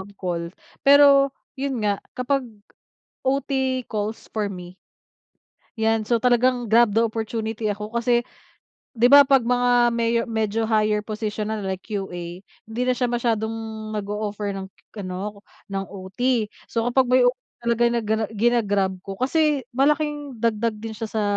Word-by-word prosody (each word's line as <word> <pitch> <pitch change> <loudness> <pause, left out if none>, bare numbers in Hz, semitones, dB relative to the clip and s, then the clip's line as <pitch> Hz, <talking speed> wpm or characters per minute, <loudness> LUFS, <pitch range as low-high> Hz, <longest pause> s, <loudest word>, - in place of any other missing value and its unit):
mag-call. 185 -3 -4 0.4
Pero 280 0 +7 0.3
yun 265 -6 -2
nga, 200 -1 +1 0.2
kapag 255 0 0 0.8
OT 265 -1 0
calls 215 0 -4
for 215 -2 -1
me 180 -2 -8 1.0
'yan. 220 0 +1
So, 230 +1 +1
talagang 245 -1 +2
grab 230 -1 +5
the 225 - +3
opportunity 220 -1 -3
ako 210 +1 -6
kasi 240 0 +3 0.7
'di 240 +1 +4
ba 285 0 +10
'pag 270 -2 +5
mga 245 +1 +2 0.2
meyo 235 0 +1
medyo 220 0 -1
higher 215 -1 +2
position 215 0 -4
na 220 - -2
like 190 -1 -3
QA, 180 -3 -6 0.2
hindi 230 +3 -3
na 255 - +3
siya 250 0 0
masyadong 225 -2 0 0.4
nag-o-offer 205 0 -3
ng 190 0 -5 0.3
k 210 - -6
ano, 195 +3 -5 0.3
ng 195 0 -2
OT. 210 +4 -1 0.2
So, 230 -1 -1
kapag 260 0 +3
may 255 0 +5
offer 250 +1 +2 0.2
talaga 235 0 +2
na 235 0 0 0.4
gina-grab 205 -4 +2
ko 195 +1 -7
kasi 295 +1 +1
malaking 290 +1 0
dagdag 225 -1 0
din 220 +1 -7
siya 225 0 -5
sa 215 0 -2
225 Hz, 145 wpm, -23 LUFS, 210-250 Hz, 1.0 s, ba